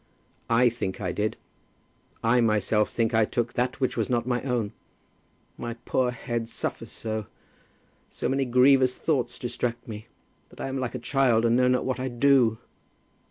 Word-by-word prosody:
"I 120 +2 +5
think 110 -5 -4
I 90 -3 -2
did. 105 +4 -2 0.9
I 120 +2 +4
myself 105 -1 +2
think 115 0 0
I 110 0 +4
took 120 +2 -1
that 125 +2 -1
which 130 - 0
was - - -1
not 120 -2 +1
my 125 -1 0
own. 120 -6 -1 0.9
My 120 -1 -4
poor 130 -1 +1
head 120 -1 -4
suffers - - -5
so; 110 -2 -4 0.8
so - - -3
many 135 +1 +1
grievous 130 +1 +4
thoughts 130 -7 -1
distract 120 -1 -3
me, 110 0 -8 0.4
that - - -18
I - - -3
am 135 0 -3
like 125 -1 -3
a - - -1
child, 120 -2 +2
and 115 0 +3
know 125 0 +4
not 125 0 +2
what 130 0 -1
I 130 - -2
do." 120 -2 +3
120 Hz, 170 wpm, -26 LUFS, 115-130 Hz, 0.9 s, I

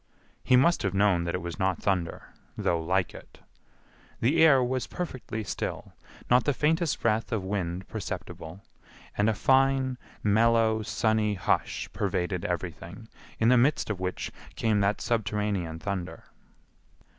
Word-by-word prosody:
He 125 - +4
must 170 +7 +4
have 95 -1 -1
known 95 -4 +3
that 85 - -1
it 90 - -4
was 85 -1 -6
not 95 -1 0
thunder, 90 -4 -2 0.2
though 85 -1 0
like 90 +2 0
it. - - -13 0.8
The 155 +8 +3
air 135 -5 +6
was 130 +1 -1
perfectly 130 -10 -5
still, 105 - -5 0.3
not 125 0 +4
the 145 - +1
faintest 160 +2 +1
breath 110 0 0
of 110 -4 -1
wind 95 -2 -3
perceptible, 80 +5 -6 0.5
and 105 +2 +2
a 110 - 0
fine, 130 0 +2 0.2
mellow, 110 +1 +3
sunny 110 -1 +1
hush 95 - -1
pervaded 90 -2 -1
everything, 90 +4 -5 0.3
in 115 - +3
the 125 -1 +6
midst 135 -2 +2
of 100 - -4
which 90 0 -3 0.2
came 110 -2 +1
that 100 +1 +1
subterranean 105 -7 -1
thunder. 95 +1 -5
105 Hz, 145 wpm, -28 LUFS, 95-120 Hz, 0.8 s, air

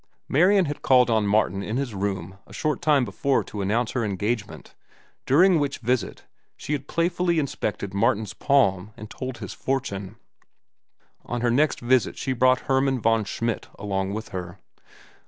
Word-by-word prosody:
Marian 185 +6 +4
had 145 -1 -5
called 125 -2 +4
on 110 -2 +2
Martin 100 -2 +1
in 110 +4 -3
his 135 -4 -3
room 95 -2 -4
a - - -14
short 150 -1 -1
time 145 -4 +3
before 135 +2 0
to 105 - -6
announce 110 +4 0
her 120 - -1
engagement, 105 +2 -3 0.5
during 170 +5 +5
which 140 -1 -1
visit 125 -2 -2 0.3
she 150 - -4
had 140 -1 -3
playfully 170 0 0
inspected 110 -9 -2
Martin's 105 -1 +1
palm 105 -5 +1
and 110 0 -10
told 130 -2 -6
his - - -7
fortune. 115 -8 -3 1.1
On 120 -1 -4
her 120 -1 +2
next 145 +5 +2
visit 125 0 +2
she 130 - -2
brought 130 +1 +3
Hermann 135 -1 +1
von 115 -1 +2
Schmidt 115 +3 -3
along 95 -1 -2
with 110 +1 -6
her. 90 -2 -6
120 Hz, 160 wpm, -24 LUFS, 100-140 Hz, 1.1 s, during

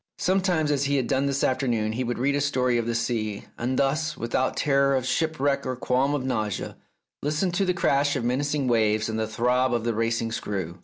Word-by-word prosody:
Sometimes, 180 -5 +1
as 140 -1 +1
he 140 +1 +1
had 130 -3 +1
done 135 +1 +1
this 140 0 -1
afternoon, 120 -5 +1
he 120 +4 -2
would 120 0 -2
read 135 +3 +1
a 145 - 0
story 125 -4 +1
of 115 - -2
the 120 - -1
sea, 110 -3 -2
and 125 +2 -2
thus, 155 +3 0
without 115 +2 -1
terror 140 -1 +3
of 130 -1 -1
shipwreck 145 -2 0
or 130 0 -3
qualms 130 +3 +1
of 130 -3 -3
nausea, 110 -6 -2 0.5
listen 155 +6 0
to 175 +3 +1
the 180 - +1
crash 145 -4 +2
of 130 - -2
menacing 140 +3 0
waves 110 -2 +2
and 110 0 -2
the 110 - -1
throb 125 +3 +1
of 115 - -1
the 115 0 0
racing 115 +1 -1
screw. 95 -5 -4
130 Hz, 215 wpm, -25 LUFS, 115-140 Hz, 0.5 s, terror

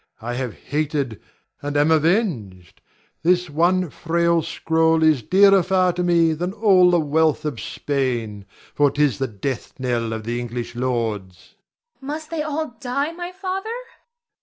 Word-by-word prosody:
I 120 +2 -5
have 125 -2 -4
hated, 145 -5 -2 0.4
and 145 0 -2
am 145 +2 +3
avenged. 150 - 0 0.4
This 180 0 +2
one 175 +2 +2
frail 170 0 +1
scroll 160 +1 +1
is 155 -5 +4
dearer 195 - +5
far 185 0 +2
to 180 - -2
me 170 -2 +3
than 175 +4 -3
all 195 -4 +5
the 175 -1 +3
wealth 155 0 +1
of 145 -7 -3
Spain, 120 -8 -3 0.3
for 145 -1 +3
'tis 145 -5 +1
the 135 - 0
death 115 +6 -5
knell 120 -3 -1
of 110 -1 -4
the 120 +2 -3
English 120 0 -5
lords. 115 -7 -2
Zara. - - -23 0.5
Must 305 +1 -5
they 325 -2 -2
all 300 -3 -3
die, 275 +4 -2
my 350 +1 -6
father? 380 +3 -4
Ber. - - -8
160 Hz, 160 wpm, -22 LUFS, 125-185 Hz, 0.5 s, dearer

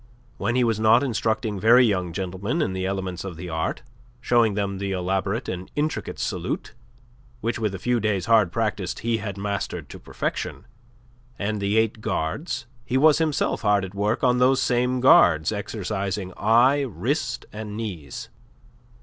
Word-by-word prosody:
When 120 - 0
he 125 - +3
was 115 -3 +1
not 110 +3 +5
instructing 110 -4 -1
very 120 +5 +6
young 90 -5 0
gentlemen 95 - -3
in 95 - -2
the 95 0 -2
elements 95 -2 -3
of 95 -4 -7
the 90 +1 -7
art, 80 0 -2 0.4
showing 120 -4 +2
them 100 -2 -2
the 100 0 -2
elaborate 95 +5 -1
and 90 0 -5
intricate 150 +1 -2
salute - - -3 0.7
which 115 +1 -2
with 105 -3 -1
a - - -4
few 120 +5 0
days' 100 -4 0
hard 110 -6 +4
practice 105 -4 -2
he 115 0 0
had 100 -3 -5
mastered 100 0 -3
to - - -9
perfection - - -4 0.7
and 105 0 -2
the 100 +2 +1
eight 110 -1 +1
guards, 110 - -2 0.2
he 130 - 0
was 150 +2 +5
himself 155 -3 0
hard 105 -3 +2
at 95 - -10
work 105 +5 -1
on 125 -1 +3
those 130 +1 +4
same 125 +1 +1
guards, 80 - +6
exercising 100 -2 -3
eye, 120 +6 +4
wrist, 130 -8 -2
and 105 -1 -6
knees. 90 - -6
105 Hz, 165 wpm, -24 LUFS, 95-120 Hz, 0.7 s, very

